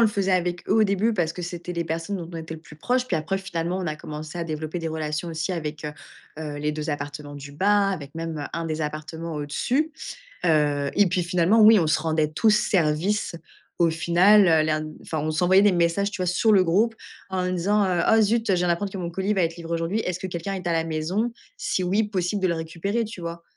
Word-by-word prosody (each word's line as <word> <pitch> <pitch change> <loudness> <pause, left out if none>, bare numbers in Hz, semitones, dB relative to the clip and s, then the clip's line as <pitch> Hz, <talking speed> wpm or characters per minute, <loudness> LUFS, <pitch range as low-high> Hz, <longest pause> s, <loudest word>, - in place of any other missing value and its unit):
le - - +7
faisait 200 -2 0
avec 175 -1 -1
eux - - +3
au 220 - +5
début 205 +3 +1
parce 165 -4 0
que 180 - -7
c'était 175 0 -5
les 170 -1 -2
personnes 165 +5 -3
dont 170 -3 -6
on 170 - -7
était 160 0 -6
le 160 - -10
plus 155 -2 -15
proche. 250 +9 0
Puis - - 0
après, 195 +5 -1
finalement, 175 -1 -3
on 185 - -3
a 155 - -2
commencé 155 +2 -7
à 170 - -2
développer 155 +1 -4
des 165 -1 -3
relations 155 +1 -3
aussi 165 +2 -3
avec, 155 -2 -4
heu 150 - -4 0.5
heu, 150 -2 -5
les 150 +1 -1
2 150 +1 -3
appartements 145 0 -5
du 140 0 -9
bas, 200 +6 +3
avec 155 -7 -5
même, 165 -1 -4
heu, 145 - -4
un 165 0 -3
des 155 0 -2
appartements 155 +2 -5
au-dessus. 245 - -1 0.5
Heu, 145 -3 +2
et 205 -1 +4
puis 180 +1 0
finalement, 180 +5 +3
oui, 215 0 +8
on 165 - +1
se 155 - +2
rendait 155 -1 0
tous 215 +8 +3
service 180 +1 +1 0.4
au 170 -1 +4
final, 185 +5 +5
heu. 160 -2 +5
L'air 155 0 +1
n 155 0 -6
enfin, 160 - -4
on 155 +1 -1
s'envoyait 180 +5 +4
des 205 -2 +5
messages 175 +4 +1
tu 195 - -5
vois - - 0
sur 215 +5 +3
le 190 -2 +6
groupe 210 +7 +2 0.3
en 185 -1 -1
disant: 200 +4 +2
«Heu, 180 -2 +1
oh, 225 0 +6
zut, 225 +2 +2
je 195 - +3
viens 180 -1 +1
d'apprendre 190 +4 0
que - - -4
mon 175 -2 -3
colis 190 +4 -1
va 195 - +1
être 165 0 -2
livré 170 0 -5
aujourd'hui. 165 +6 -1
Est-ce 180 -4 -2
que 190 - -4
quelqu'un 175 +2 -4
est 185 -2 -5
à - - +1
la 165 -1 +1
maison? 175 +9 -1 0.2
Si 185 - -1
oui, 195 +5 +2
possible 200 -1 -2
de - - +4
le 170 - +1
récupérer?» 170 +7 -2
Tu 220 -3 -8
vois? 170 0 -6
170 Hz, 250 wpm, -24 LUFS, 155-195 Hz, 0.5 s, oui